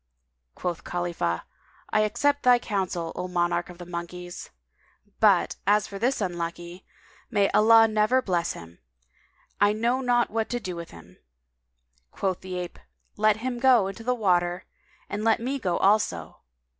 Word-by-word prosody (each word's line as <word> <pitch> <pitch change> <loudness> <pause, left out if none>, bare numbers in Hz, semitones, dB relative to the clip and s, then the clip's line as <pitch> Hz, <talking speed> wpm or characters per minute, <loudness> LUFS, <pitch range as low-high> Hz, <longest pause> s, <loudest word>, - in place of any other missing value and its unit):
Quoth 170 -6 -4
Khalifah, 170 - -2 0.5
"I 215 - +3
accept 285 +7 +1
thy 250 -1 +6
counsel, 185 -7 -3
O 180 - -3
monarch 175 -1 0
of 180 - -10
all 175 0 -10
the 175 - -14
monkeys! 175 +1 -7 0.7
But, - - +3
as 210 0 +4
for 200 - -8
this 245 +2 0
unlucky, 175 0 -4 0.5
may 205 -5 +2
Allah 225 +1 +6
never 215 +4 +2
bless 175 -8 -1
him! 85 0 -12 0.8
I 205 0 +4
know 235 +4 0
not 245 -1 +2
what 225 0 -1
to 245 - -2
do 185 -6 -5
with 170 -1 -7
him." 85 +2 -15 0.9
Quoth 185 - -2
the 185 -1 -6
ape, 180 -1 -6 0.4
"Let 215 0 +3
him 250 -2 -2
go 250 -4 +5
[FN#200] 190 - -2
into 225 +3 -9
the 250 +2 0
water, 180 -4 +1 0.4
and 205 +1 -4
let 225 0 +3
me 265 +4 -2
go 180 -7 -1
also." 140 - +1
195 Hz, 160 wpm, -26 LUFS, 175-225 Hz, 0.9 s, thy